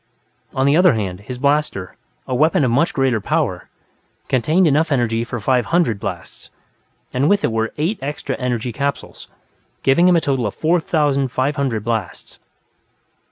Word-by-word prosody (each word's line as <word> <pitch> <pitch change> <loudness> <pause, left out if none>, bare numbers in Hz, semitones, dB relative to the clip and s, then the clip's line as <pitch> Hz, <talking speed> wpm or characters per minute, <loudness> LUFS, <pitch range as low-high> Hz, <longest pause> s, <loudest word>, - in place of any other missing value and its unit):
On 130 - +1
the 140 +2 +4
other 180 -3 +5
hand, 95 -4 -3
his 125 +5 -8
blaster, 140 -9 -1 0.3
a 130 - -3
weapon 150 +3 +3
of 125 - +1
much 150 +10 +2
greater 130 - 0
power, - - -2 0.6
contained 155 +9 +2
enough 155 +1 +2
energy 115 -4 +1
for 120 +1 -5
five 125 +3 +1
hundred 165 - +1
blasts, - - -7 0.6
and 135 +4 +1
with 205 0 +2
it - - +1
were 110 0 -1
eight 165 +9 -1
extra 140 -1 -4
energy 125 -1 -2
capsules, 140 +2 -4 0.6
giving 155 +7 +4
him 180 - +5
a - - +5
total 135 -7 -1
of 100 - -6
four 170 +3 +2
thousand 145 -4 +1
five 130 +4 -1
hundred 130 -7 -1
blasts. 110 -7 -4
135 Hz, 165 wpm, -19 LUFS, 115-150 Hz, 0.6 s, other